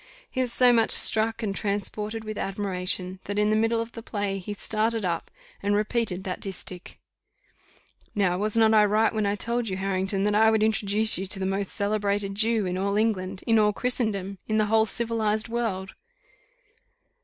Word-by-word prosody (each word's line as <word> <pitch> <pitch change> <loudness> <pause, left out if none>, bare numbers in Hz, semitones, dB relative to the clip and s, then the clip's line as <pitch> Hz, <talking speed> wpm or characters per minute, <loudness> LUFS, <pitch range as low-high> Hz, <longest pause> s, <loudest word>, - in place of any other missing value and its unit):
He 260 - -1
was 250 -2 -1
so 250 0 +5
much 225 -1 +3
struck 225 +1 +5
and 200 -2 -2
transported 210 +2 -3
with 215 0 -6
admiration, 185 -1 -2
that 205 +1 -4
in 210 0 +2
the - - +2
middle 225 +1 +1
of 230 0 -4
the 230 - -9
play, 205 -3 -3
he 205 +3 -6
started 220 +1 -1
up, 170 -2 -2 0.3
and 205 0 +1
repeated 210 -3 -1
that 185 -1 -4
distich. 185 -2 -8 1.2
"Now, 185 -3 +1
was 215 +2 -1
not 220 -1 +5
I 215 -1 +6
right 215 +2 +2
when 215 -2 0
I 200 - 0
told 235 +2 -1
you, 190 - -3
Harrington, 195 0 -1
that 210 0 +1
I 220 +1 +5
would 220 -1 +2
introduce 215 -1 +2
you 190 - -4
to 195 - 0
the 190 - -3
most 195 0 -2
celebrated 205 -1 -1
Jew 220 0 +1
in 180 0 -2
all 200 +1 0
England, 195 -4 -1
in 225 -1 +3
all 210 -1 +3
Christendom, 200 -6 -2
in 215 - 0
the 215 - +3
whole 220 0 +4
civilized 220 -1 -1
world?" 210 -5 -3
210 Hz, 190 wpm, -25 LUFS, 195-220 Hz, 1.2 s, I